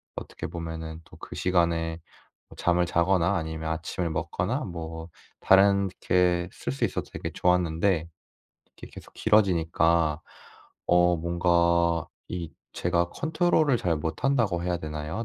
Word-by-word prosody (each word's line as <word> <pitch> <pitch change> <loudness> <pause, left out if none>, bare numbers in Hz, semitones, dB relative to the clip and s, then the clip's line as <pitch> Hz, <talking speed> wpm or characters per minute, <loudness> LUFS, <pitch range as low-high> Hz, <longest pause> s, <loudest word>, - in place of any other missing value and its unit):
어떻게 - - -6
보면은 80 -1 -6
또 - - -16
그 - - -9
시간에 85 -2 0 0.6
잠을 90 0 +2
자거나 90 +2 +2
아니면 80 0 -4
아침을 85 +2 -3
먹거나 90 - -2
뭐 80 -2 -7 0.3
다른 100 0 +5
게 90 -1 +2
쓸 70 - -4
수 70 - 0
있어서 - - -4
되게 - - -5
좋았는데 90 -1 +1 0.7
이게 - - -10
계속 - - -12
길어지니까 85 -6 +2 0.7
어 90 0 +4
뭔가 85 -1 +2 0.2
이 85 -3 -5 0.2
제가 85 0 0
컨트롤을 160 -4 +2
잘 85 -5 0
못한다고 95 - 0
해야 90 -1 0
되나요? 75 +7 -5
85 Hz, 270 characters per minute, -26 LUFS, 80-90 Hz, 0.7 s, 다른